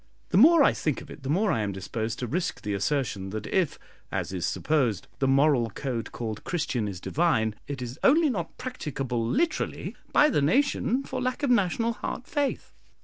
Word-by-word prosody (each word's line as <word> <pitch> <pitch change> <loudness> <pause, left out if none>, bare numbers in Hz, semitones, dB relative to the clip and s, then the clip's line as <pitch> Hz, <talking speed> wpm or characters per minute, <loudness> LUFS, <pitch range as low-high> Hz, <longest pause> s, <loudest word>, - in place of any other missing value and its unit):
The 180 - +2
more 310 - +8
I - - +5
think 150 -4 -1
of - - -12
it - - -10
the 135 - -5
more 195 +6 +2
I 115 - +1
am 100 -1 -1
disposed 110 +4 -4
to 125 - -3
risk 175 +9 -2
the 105 - -2
assertion, 100 -2 -1
that 105 +1 -5
if, 185 +1 0 0.3
as - - -2
is 90 -1 -1
supposed, 135 -10 0
the 135 - +2
moral 135 -3 +4
code 115 0 -4
called 110 -3 -5
Christian 155 -10 -1
is 95 -3 -5
divine, 110 - +1
it 135 -3 -4
is 125 +1 -7
only 305 +1 +5
not 175 -8 -4
practicable, 135 - -3
literally, 315 - -1 0.2
by 300 0 +5
the 150 - +2
nation 255 - +2
for 255 -1 -4
lack 255 +3 -2
of 275 - +2
national 230 +1 +2
heart 245 - -5
faith. 290 -3 -2
145 Hz, 195 wpm, -27 LUFS, -, 0.3 s, more